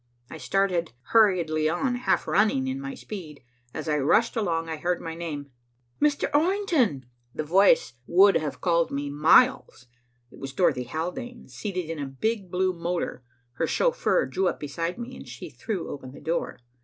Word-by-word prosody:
I 160 - -8
started 180 -7 0 0.2
hurriedly 170 -8 +3
on, 210 +10 0
half 245 +1 0
running 220 +7 +2
in 265 +1 -3
my 275 -1 -5
speed. 165 - -9 0.3
As - - -6
I 150 -1 +1
rushed 225 - +3
along, 165 -7 -1
I 160 -1 -4
heard 175 +3 -1
my 165 - -6
name, 150 -4 -6 0.5
"Mr. 295 -1 +2
Orrington!" 305 - +2 0.3
The - - -2
voice 185 -2 +4
would 195 +3 +6
have 150 -2 -4
called 170 -2 +2
me 140 0 -3
miles. 155 - +4 0.5
It - - -14
was 135 -1 -6
Dorothy 125 -1 +1
Haldane, 180 - -5
seated 185 -5 -4
in 165 -1 -5
a 140 - -3
big 195 - -2
blue 185 +1 +1
motor. 170 -6 -3 0.4
Her - - 0
chauffeur - - +2
drew 190 0 0
up - - -2
beside 165 +5 -3
me, 245 +2 -7
and - - -11
she 125 - -9
threw 180 - -4
open 130 -2 -8
the - - -11
door. 165 +1 -2
175 Hz, 170 wpm, -26 LUFS, 155-225 Hz, 0.5 s, would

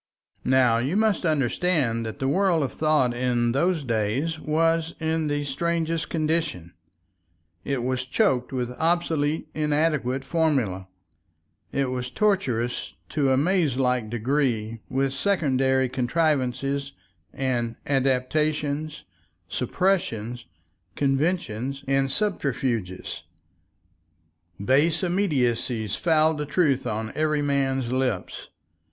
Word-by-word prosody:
Now 125 -3 +4
you 140 +11 0
must 215 -5 +2
understand 140 -4 +1
that 110 - -6
the 135 - -1
world 175 +1 +2
of 135 - -2
thought 155 -6 +2
in 120 -1 +1
those 165 +4 +1
days 120 +7 -1
was 165 +1 +1
in 160 -1 0
the 145 0 -1
strangest 165 +3 -1
condition, 155 - -1 0.9
it 135 -3 -2
was 130 0 -1
choked 130 0 +1
with 125 -2 -2
obsolete 160 -2 +1
inadequate 150 -4 0
formulae, 130 - 0 0.8
it 135 -2 0
was 125 -1 -3
tortuous 130 - 0
to 140 -3 +1
a 130 - +3
maze 155 -3 +2
like 125 -4 +1
degree 115 -2 -1
with 135 0 0
secondary 135 -6 +2
contrivances 140 0 0 0.4
and 120 -3 -1
adaptations, 145 +3 0 0.5
suppressions, 125 - -1 0.5
conventions, 135 -3 -1
and 135 0 +2
subterfuges. 130 - -2 1.4
Base 150 - +3
immediacies 125 - 0
fouled 160 -2 +2
the 150 - -3
truth 150 -4 +1
on 110 +1 -3
every 155 -1 +1
man's 135 -3 0
lips. 130 -7 -2
135 Hz, 105 wpm, -25 LUFS, 125-160 Hz, 1.4 s, Now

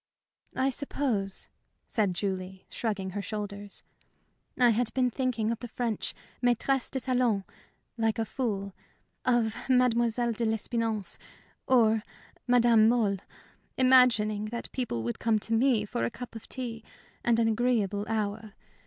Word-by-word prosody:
"I 265 +1 +2
suppose," 245 -8 -1 0.4
said 205 -6 0
Julie, 190 -1 -4
shrugging 200 -5 -2
her 205 +2 -3
shoulders, 205 0 -6 0.7
"I 245 -2 +5
had 230 +1 0
been 250 -2 +2
thinking 230 -4 0
of 230 - -3
the 245 - -6
French 230 -2 -3 0.3
maîtresses 245 +2 +1
de 265 - -2
salon, 245 -5 +1 0.6
like 225 -1 +1
a 225 - 0
fool; 200 -6 -3 0.5
of 235 -3 +2
Mademoiselle 240 -2 +3
de 230 +1 -3
l'Espinasse 220 -3 -1 0.5
or 225 -4 +4 0.5
Madame 235 -3 +5
Mohl 220 -5 +2 0.6
imagining 240 -5 +5
that 235 +2 -5
people 225 - -2
would 120 +1 -3
come 225 -1 +2
to 225 +2 -2
me 230 -2 +3
for 160 - -3
a 115 - +1
cup 245 - -9
of 225 - -10
tea 235 -4 -5 0.4
and 235 -1 +3
an 230 - +3
agreeable 215 -3 +1
hour. 215 -1 -2
225 Hz, 135 wpm, -29 LUFS, 210-245 Hz, 0.7 s, I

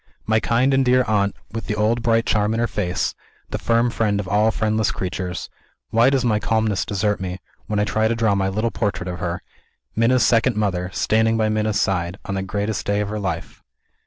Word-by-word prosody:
My 110 0 +3
kind 125 +5 +2
and 135 0 +4
dear 125 0 +4
aunt 100 -2 +1 0.2
with 115 +2 -5
the 105 - -1
old 110 +3 +1
bright 115 -1 +2
charm 105 +1 +1
in - - -1
her 120 - +2
face; 90 -6 -1 0.4
the - - -2
firm 115 +1 +2
friend 105 -3 0
of 100 - -4
all 105 +4 +3
friendless 110 -1 0
creatures 90 -2 -4 0.4
why 115 +3 +5
does 135 -2 +1
my 110 -3 +2
calmness 110 -3 0
desert 105 +1 0
me, 90 -1 -4 0.3
when 105 - -1
I 105 - +3
try 110 +1 +1
to 115 - 0
draw 115 -2 +2
my 95 -1 +1
little 110 +4 -1
portrait 100 -4 -2
of 90 0 -4
her; 85 0 -3 0.5
Minna's 120 +2 +3
second 120 0 +3
mother, 95 -4 -1
standing 110 +3 +2
by 110 -1 +2
Minna's 110 -1 0
side, 90 -3 0
on 100 - -3
the 95 - -1
greatest 100 +1 -2
day 100 0 0
of 105 - -2
her 105 0 -3
life? 95 -3 -4
110 Hz, 215 wpm, -22 LUFS, 100-115 Hz, 0.5 s, why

